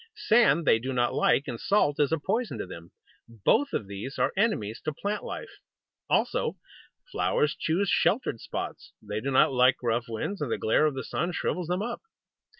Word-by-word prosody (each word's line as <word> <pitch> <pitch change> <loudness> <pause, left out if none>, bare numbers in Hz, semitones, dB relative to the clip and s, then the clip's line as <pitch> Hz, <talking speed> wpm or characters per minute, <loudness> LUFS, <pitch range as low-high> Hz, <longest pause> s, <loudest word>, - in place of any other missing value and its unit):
Sand 225 - +3
they 115 - +5
do 130 +3 -4
not 120 -1 +1
like, 140 - +2
and 120 -4 -5
salt 195 -8 +2
is 145 -1 +2
a 160 - +2
poison 195 - -2
to - - -4
them. 85 -2 -10 0.4
Both 115 - +1
of 105 - -2
these 100 +7 -7
are - - +1
enemies 150 - 0
to 155 - -1
plant 205 +7 -3
life. - - -6 0.6
Also, - - +1 0.5
flowers 150 0 +1
choose 180 +6 0
sheltered 195 - +1
spots. - - -6
They 105 +1 -5
do 135 - -2
not 135 0 +4
like 125 0 +5
rough 115 0 0
winds, 135 - -4
and 140 -6 -2
the - - 0
glare 150 +7 +3
of 145 - -2
the 130 - -4
sun 175 +1 -2
shrivels 180 -1 -2
them 180 +3 -1
up. 240 +1 -4
140 Hz, 190 wpm, -27 LUFS, 115-190 Hz, 0.6 s, they